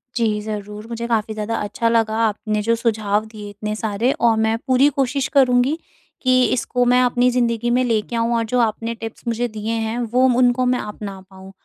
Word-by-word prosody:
जी 220 -3 +1
ज़रूर, 210 0 -6
मुझे 235 0 -4
काफ़ी 220 -2 0
ज़्यादा 215 +1 -3
अच्छा 210 +3 -1
लगा 225 -1 +1
आपने 215 0 -2
जो 230 +2 +1
सुझाव 215 -2 0
दिए 215 -2 -9
इतने 210 +1 -5
सारे 220 +3 0
और 230 -4 +2
मैं 220 0 +1
पूरी 260 +2 +4
कोशिश 275 0 0
करूँगी 260 +1 +3 0.4
कि 255 -1 +4
इसको 245 0 0
मैं 250 - +5
अपनी 245 0 +2
ज़िंदगी 240 -1 0
में 250 +1 +2
लेके 230 0 -1
आऊँ 230 +1 +1
और 230 - +1
जो 250 +3 0
आपने 230 0 -1
टिप्स 225 0 -8
मुझे 235 +1 0
दिए 215 0 -5
हैं, 225 0 -2
वो, 245 +2 +2
उनको 250 0 +3
मैं 250 0 +1
अपना 205 -2 -7
पाऊँ। 190 0 -13
230 Hz, 195 wpm, -20 LUFS, 215-245 Hz, 0.4 s, मैं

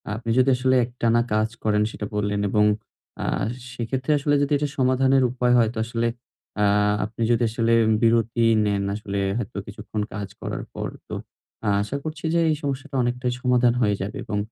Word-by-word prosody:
আপনি 115 +1 -6
যদি 130 +1 +5
আসলে 130 +1 +2
একটানা 120 -1 +1
কাজ 110 +1 +2
করেন 105 -1 +2
সেটা 105 - -5
বললেন 105 0 0
এবং 105 +1 +3 0.6
আ - - -2 0.5
সেক্ষেত্রে 130 +4 -2
আসলে 145 +1 +2
যদি 145 +1 0
এটা 145 +1 -1
সমাধানের 130 +1 +3
উপায় 125 -1 +1
হয় 115 -2 +4
তো - - -10
আসলে 115 0 -1 0.5
আ - - +4 0.4
আপনি 115 +2 -8
যদি 120 +1 +2
আসলে 115 0 +1 0.3
বিরতি 115 0 +3 0.2
নেন 100 -1 0
আসলে 100 -1 -4 0.2
হয়তো 120 -2 -5
কিছুক্ষণ 105 +1 -5
কাজ 105 -2 -4
করার - - -4
পর - - -3 0.2
তো - - -7 0.5
আ - - 0
আশা 120 +7 -3
করছি 155 +1 -6
যে 170 - +3
এই 155 - +2
সমস্যাটা 140 0 -4
অনেকটাই 125 +1 -1
সমাধান 125 -1 +3
হয়ে 105 -2 +3
যাবে 100 +2 -4
এবং 105 -1 -2
120 Hz, 180 wpm, -24 LUFS, 110-130 Hz, 0.6 s, যদি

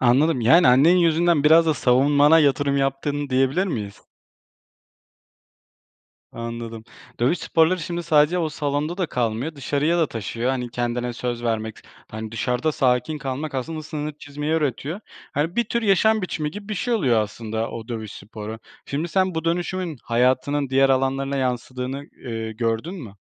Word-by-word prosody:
Anladım, 130 +3 +3
yani 160 +8 +6
annen 145 +9 +6
yüzünden 170 -2 +3
biraz 165 +2 +6
da 155 - +3
savunmana 145 +5 +4
yatırım 140 -1 +2
yaptın 140 +1 -1
diyebilir 135 +8 +2
miyiz? 105 - -5 2.3
Anladım. 115 -1 -6 0.4
Dövüş 135 +9 +2
sporları 165 +3 +2
şimdi 175 +1 -4
sadece 155 +1 +3
o 165 -3 0
salonda 150 +3 -2
da 180 - 0
kalmıyor, 125 +5 -2
dışarıya 145 +5 0
da 160 - +3
taşıyor, 115 +2 -3
hani, 125 -2 -3
kendine 120 0 -2
söz 120 0 -4
vermek, 110 -1 -2
s - - -17 0.3
hani, 110 0 -6
dışarıda 125 +6 0
sakin 125 +4 +1
kalmak 135 +2 -4
aslında 155 +5 -4
sınır 150 0 -5
çizmeyi 145 +2 -4
öğretiyor. 155 - -1 0.3
Hani, 160 +7 -1
bir 235 - +3
tür 235 +2 -2
yaşam 215 +1 +3
biçimi 155 -4 -3
gibi 205 +5 -9
bir 215 - -2
şey 240 +5 -1
oluyor 125 - +2
aslında 110 +2 -4
o 115 0 -8
dövüş 110 -3 -5
sporu. 110 +2 -8 0.3
Şimdi 155 +5 -2
sen 185 +1 +1
bu 160 0 -3
dönüşümün 175 -2 -2
hayatının 130 +4 +1
diğer 135 +1 +4
alanlarına 135 +1 +1
yansıdığını, 125 0 -2 0.3
ııı, 115 -2 -4
gördün 115 - -2
mü? 120 - -9
140 Hz, 155 wpm, -23 LUFS, 120-160 Hz, 2.3 s, yani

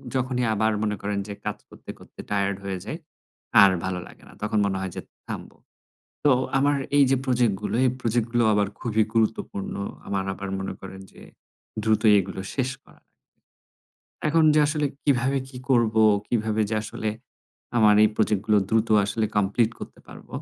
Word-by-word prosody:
যখনই 125 -1 0
আবার 110 +1 +1
মনে 105 -1 0
করেন 100 0 -2
যে 100 - -5
কাজ - - -2
করতে, - - -15
করতে - - -18
টায়ার্ড 100 -1 0
হয়ে 95 -1 -3
যাই, 155 - -5 0.6
আর 100 -1 +8
ভালো 95 -1 -2
লাগে - - -17
না। - - -15
তখন 105 +1 -1
মনে 100 -1 -1
হয় 95 -1 -4
যে - - -4 0.3
থামব। - - -6 0.7
তো 145 - +6 0.3
আমার 145 +1 +2 0.2
এই 145 - +7
যে 135 - +4
প্রজেক্ট 125 -5 +2
গুলো, - - -3
এই 130 - +4
প্রজেক্ট 115 -1 0
গুলো 120 -1 +3
আবার 105 -1 +2
খুবই 110 -3 +1
গুরুত্বপূর্ণ। 110 -3 -1 0.3
আমার 100 -1 -2
আবার 100 0 -6
মনে 95 - -4
করেন 95 0 -9
যে - - -15 0.6
দ্রুতই 110 0 +4
এগুলো 95 - -6
শেষ 130 -2 0
করা - - -21 1.3
এখন 160 +2 +3
যে 155 - +4
আসলে 150 0 0 0.2
কিভাবে 135 -1 +2
কি 130 - -10
করবো, 115 -3 +3 0.2
কিভাবে 110 -2 0
যে 110 - -1
আসলে 110 0 -4 0.7
আমার 105 -2 +6
এই 110 - +5
প্রজেক্ট 105 -2 +1
গুলো 105 -1 +4
দ্রুত 110 0 +2 0.2
আসলে 110 +2 -1
কমপ্লিট 105 +3 +2
করতে - - -10
পারব। - - -13
110 Hz, 175 wpm, -25 LUFS, 100-125 Hz, 1.3 s, আর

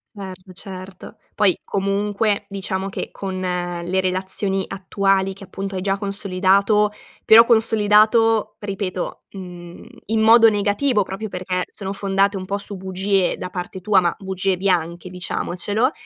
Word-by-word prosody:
Erto, 190 -2 -9
certo. 185 0 -9 0.2
Poi 200 -4 +2
comunque, 200 +1 -1
diciamo 195 -1 -3
che, - - -5
con 190 -1 -5
le 180 0 -2
relazioni 190 +1 -1
attuali 195 0 0
che, 195 - -13
appunto, 195 0 -6
hai 185 - -2
già 195 +1 0
consolidato 200 +1 +2 0.3
però 225 +1 +8
consolidato, 220 -1 +4
ripeto, 195 -3 -4
mhmm, 175 -2 -10 0.2
in 220 0 0
modo 225 +1 +7
negativo, 210 +3 +1
proprio 195 +3 -6
perché 180 -1 -3
sono 195 -2 -6
fondate 195 0 +1
un 185 - -6
pò 200 +2 -2
su 200 0 -7
bugie 190 0 0
da 180 - -5
parte 180 +1 -6
tua, 195 +1 +4
ma 175 -2 0
bugie 190 -1 -1
bianche, 175 -2 -1
diciamocelo, 185 +6 -1
195 Hz, 140 wpm, -21 LUFS, 185-205 Hz, 0.3 s, però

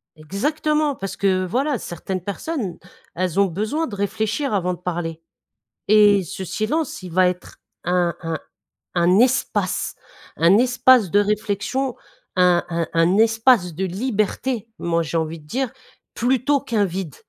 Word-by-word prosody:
Exactement, 295 - -1
parce 195 -4 -5
que 190 -2 +2
voilà, 260 +7 0
certaines 180 +2 -5
personnes, 200 - -4 0.4
elles 185 +1 -1
ont 200 - +6
besoin 215 - -2
de 210 - -7
réfléchir 220 +6 -1
avant 180 -2 0
de - - -19
parler. 165 -2 -4 0.7
Et 205 -1 +6
ce 190 +4 -6
silence, 240 - -2
il 180 -2 -8
va 185 0 +4
être 180 -1 -6 0.3
un 175 -1 +1
un 165 -1 -3 0.6
un 175 +2 +4
espace, 255 +2 +1 0.4
un 170 +5 +5
espace 245 -4 +4
de 205 - +4
réflexion, 210 +5 -1 0.4
un 180 -1 +4
un 170 -1 -1
un 165 +4 +3
espace 225 -5 +3
de 190 +4 -2
liberté, 215 +3 -2
moi 170 -1 0
j'ai 165 +1 -2
envie 160 0 -3
de 150 - -19
dire, 260 - -2 0.4
plutôt 260 +3 +1
qu'un 220 -7 0
vide. 180 -5 -5
200 Hz, 145 wpm, -22 LUFS, 175-245 Hz, 0.7 s, ont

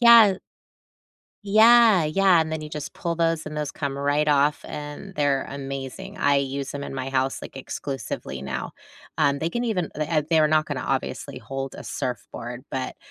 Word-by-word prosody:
Yeah, 235 -4 +9
h 185 - -7 1.1
Yeah, 220 -3 +6
yeah, 180 +2 +4
and 160 0 -1
then 160 - -2
you 155 - -7
just 150 -1 -6
pull 170 -1 -2
those 165 -1 0
and 150 - -6
those 150 -1 -2
come 140 -2 -4
right 145 +2 +1
off, 145 0 +2
and 150 +6 -7
they're 145 -2 +1
amazing; 135 +8 -6
I 145 0 +3
use 140 0 -2
'em 140 - -4
in 140 - -6
my 130 0 -3
house, 135 0 0
like, - - -10
exclusively 130 - -5
now. 70 - -4 0.5
Um, 140 0 +3
they 165 +3 -1
can 240 - -2
even 185 -8 -1
le 155 - 0
eh, 155 -1 +1
they're 160 -2 +4
not 155 0 +3
gonna - - -3
obviously - - -3
hold 135 -1 -5
a - - -9
surfboard, 120 0 -5
but 130 -2 -3
150 Hz, 190 wpm, -24 LUFS, 135-170 Hz, 1.1 s, Yeah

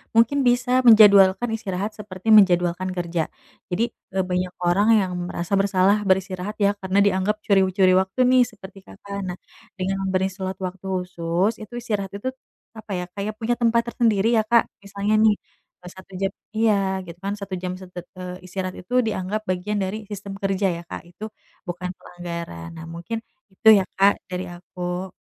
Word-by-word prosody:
mungkin 230 +5 +4
bisa 245 +1 +1 0.2
menjadwalkan 205 0 +7
istirahat, 200 -1 -3
seperti 190 0 -9
menjadwalkan 180 -1 +3
kerja. 170 -2 -1 0.5
Jadi, 205 - +1 0.3
eee, 190 - +1
banyak 180 0 -1
orang 200 +5 +3
yang 185 -2 -2 0.2
merasa 175 +2 -4
bersalah 195 0 +3
beristirahat, 190 +2 0
ya, 200 0 +4
karena 190 +1 +1
dianggap 200 +1 +1
curi-curi 190 -1 +4
waktu, 190 +6 -7
nih, 255 -1 +6
seperti 195 -2 -12
Kakak. 200 - -9
Nah, 180 0 -5 0.4
dengan 195 +1 -1
memberi 190 0 +1
slot 190 0 -5
waktu 185 +1 -5
khusus, 180 +2 -1
itu 215 +3 -10
istirahat 205 -5 -3
itu, 255 +6 -3 0.5
apa 220 -1 -10
ya 180 - -3
Kak 200 +2 -7
ya, 215 - -2
punya 225 +2 -1
tempat 235 -1 +3
tersendiri, 225 -3 +2
ya, 215 - +2
Kak. 235 +1 +3
Misalnya, 200 +2 0
nih, 210 -2 +4 0.5
e - - -10
satu 190 +1 -15
jam 195 - +1 0.2
Iya, 220 -1 +3 0.3
gitu, 170 0 -10
kan, 195 +2 -3
satu 200 -2 -8
jam 180 0 -4
se 185 - -8
eee, 180 +1 -8
istirahat 185 0 -4
itu 185 - -10
dianggap 205 +1 -2
bagian 185 +3 -1
dari 190 +3 -3
sistem 200 -1 -6
kerja, 195 0 0
ya, - - -7
Kak. - - -6
Itu 190 +5 -12 0.4
bukan 175 +1 -4
pelanggaran. 170 - -7
Nah, 160 - -8
mungkin 170 +7 -5 0.3
itu, 190 - -3
ya, 195 - +2
Kak, 200 +1 +6 0.2
dari 180 +1 -3
aku. 180 +1 -5
190 Hz, 170 wpm, -23 LUFS, 180-210 Hz, 0.5 s, menjadwalkan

